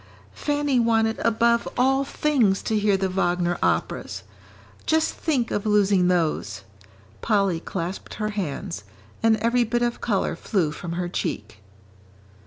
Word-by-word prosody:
"Fanny 290 -3 0
wanted 225 -1 +2
above 235 +1 +2
all 270 +2 +3
things 265 -9 +1
to 220 - -1
hear 205 -1 +2
the 190 0 0
Wagner 175 -2 0
operas - - -1 0.6
just 320 0 +2
think 270 -8 -1
of 205 - -1
losing 200 -3 +3
those!" 160 - 0 0.6
Polly 200 -6 +1
clasped 180 +2 -5
her 215 0 -2
hands, 145 - -4 0.4
and 225 -1 +4
every 235 +2 +2
bit 240 +1 0
of 240 0 -1
colour 205 -5 0
flew 180 -8 0
from 170 +2 -6
her 175 +1 -2
cheek. 105 - -4
210 Hz, 135 wpm, -24 LUFS, 180-235 Hz, 0.6 s, and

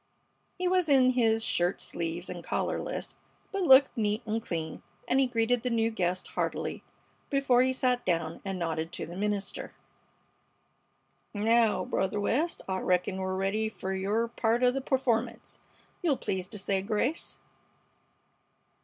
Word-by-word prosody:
He 365 0 0
was 365 -3 +2
in 260 -2 +6
his 225 -3 +2
shirt 175 -2 +1
sleeves 170 +1 -4
and 175 -1 -7
collarless, - - -3 0.3
but 395 - -1
looked 270 -5 +7
neat 215 +1 0
and 225 +1 -1
clean, 160 -5 -4 0.3
and 260 - +3
he 270 - +4
greeted 240 0 +1
the 250 - -1
new 230 -1 +1
guest 185 -3 -1
heartily - - -3 0.5
before 275 -3 +3
he 260 +1 +3
sat 250 -1 +1
down, 165 -3 -1
and 195 -1 -3
nodded 165 -1 -2
to - - -4
the 170 - -9
minister: 205 0 -3 1.6
"Naow, 220 -3 +3
Brother 195 +2 -1
West, 285 +11 0
I 190 -1 -1
reckon 180 +1 +1
we're 190 0 -2
ready 200 +3 0
fer 190 -3 -5
your 205 +5 0
part 230 +1 0
o' 250 - +6
the 270 +1 -2
performance. 245 -3 -1 0.4
You'll 305 -7 +2
please 185 -1 -3
to 210 - -5
say 195 -1 0
grace." 225 - -1
220 Hz, 150 wpm, -29 LUFS, 190-250 Hz, 1.6 s, looked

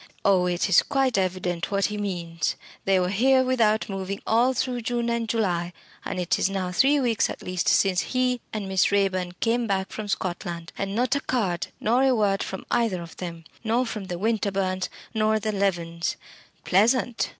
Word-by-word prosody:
Oh, 185 -2 +4
it 175 +2 0
is 190 - +6
quite 270 -3 +1
evident 185 -2 -1
what 200 -1 +1
he 210 - -2
means. 170 -5 -2 0.3
They 195 -1 +4
were 180 0 0
here 260 +6 +4
without 230 -4 +2
moving 195 0 -4
all 245 +4 +3
through 250 0 -1
June 235 0 -1
and 230 -1 -1
July, 180 -6 0 0.3
and - - -4
it 180 -1 0
is - - +2
now 190 -2 -2
three 275 +10 +4
weeks 235 -5 +1
at - - -7
least 180 -1 -2
since 190 -2 +3
he 255 -1 0
and 210 -3 -4
Miss 190 -1 +2
Raeburn 185 -3 +1
came 235 +1 +1
back 190 -1 -1
from 215 -1 -5
Scotland, 175 -3 -4
and 195 0 -3
not 250 +3 +1
a 280 - 0
card 195 -9 -1
nor 240 +4 +2
a 265 -1 +4
word 200 -3 +1
from 190 - -5
either 210 -7 +1
of 165 - -12
them! 170 -2 -6 0.2
Nor 235 +3 +1
from 215 -4 -5
the 180 -2 -4
Winterbournes, 195 -3 0 0.2
nor 220 -1 +2
the 215 +1 -2
Levens. 175 -4 -1 0.5
Pleasant! 230 +5 +2
200 Hz, 185 wpm, -25 LUFS, 185-235 Hz, 0.5 s, is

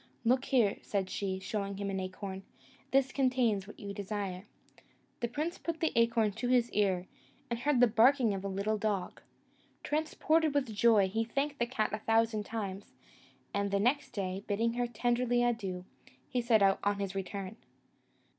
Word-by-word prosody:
"Look 255 +3 +3
here," 230 -7 +2
said 195 -2 -2
she, 190 -2 -2
showing 200 0 -3
him 200 0 -3
an 190 - -2
acorn, 190 +1 -5 0.5
"this 270 0 +3
contains 250 -7 +1
what 210 - -12
you 200 -1 -6
desire." 200 -1 -4 0.7
The 235 - 0
prince 305 +8 -3
put 335 -1 -4
the 320 - +1
acorn 230 -2 +3
to 245 +5 -4
his 245 -1 +3
ear, 190 -3 +1 0.5
and 235 - -1
heard 285 0 +2
the 245 - +8
barking 235 +1 +4
of 195 -1 -4
a - - -2
little 200 +2 -1
dog. 200 -4 -2 0.6
Transported 310 0 +1
with 260 -6 0
joy, 210 -2 +5
he 225 +4 0
thanked 280 +5 -2
the 235 - +1
cat 220 -4 -1
a 215 - -1
thousand 225 -1 +1
times; 205 -3 -5 0.6
and 200 0 0
the 200 0 +1
next 260 +7 +1
day, 195 -3 -4
bidding 230 +3 +1
her 245 0 0
tenderly 240 +1 +1
adieu, 195 -7 -1 0.4
he 250 - -1
set 230 -3 +4
out 195 0 +4
on 205 0 +1
his 200 -1 -3
return. 195 +1 -5
220 Hz, 175 wpm, -32 LUFS, 200-245 Hz, 0.7 s, the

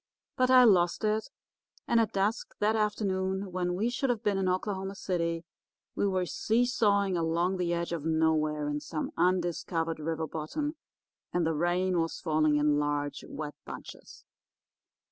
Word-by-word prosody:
But 255 -1 +2
I 255 -1 +8
lost 180 -4 +4
it, 215 +1 0 0.6
and 235 - +4
at 225 -1 +1
dusk 200 +4 -1
that 215 +2 +2
afternoon, 195 -3 -1
when 180 0 -1
we 220 +6 0
should 265 +2 -1
have 235 -3 -1
been 200 -2 +1
in 190 -1 +1
Oklahoma 190 +1 -2
City, 170 -3 -2 0.5
we 205 - 0
were 185 -2 0
seesawing 210 -3 +2
along 170 +3 0
the 175 -1 -1
edge 170 0 -1
of 165 -4 -3
nowhere 155 -2 +1
in 145 0 -1
some 275 - -4
undiscovered 170 -2 0
river 160 +1 -2
bottom, 290 - -4 0.6
and 175 -2 +1
the 160 - +1
rain 175 +3 +1
was 165 - -3
falling 155 -2 +2
in 150 0 +3
large, 145 -1 -2
wet 150 -1 -5
bunches. - - -10
180 Hz, 155 wpm, -29 LUFS, 160-205 Hz, 0.6 s, I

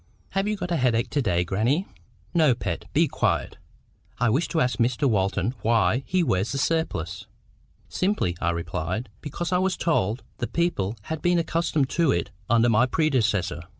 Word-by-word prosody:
"Have 195 +1 -1
you 215 - 0
got 180 -2 -4
a 170 - +2
headache 120 -3 +1
to 145 - +1
day, 90 -7 +1
grannie?" 115 - 0 0.5
"No, 155 -7 +4
Pet. 90 -7 -4
Be - - +3
quiet. - - -1 0.6
I 120 -2 +2
wish 145 +9 +1
to 165 - -1
ask 125 -3 +1
Mr 125 +4 +2
Walton 100 +2 +1
WHY 115 +2 +2
he 185 -1 +2
wears 100 - 0
the 140 - -2
surplice." 95 - -1 0.6
"Simply," 185 - 0
I 85 - +1
replied, 85 +6 -3
"because 170 +4 -4
I 180 - +3
was 190 0 0
told 115 - 0 0.2
the 120 - -1
people 120 - -1
had 160 +5 -5
been 175 0 +3
accustomed 165 -4 0
to 165 -4 +2
it 85 - -1 0.2
under 115 +1 +4
my 115 +2 +4
predecessor." 110 - +1
125 Hz, 175 wpm, -25 LUFS, 100-165 Hz, 0.6 s, No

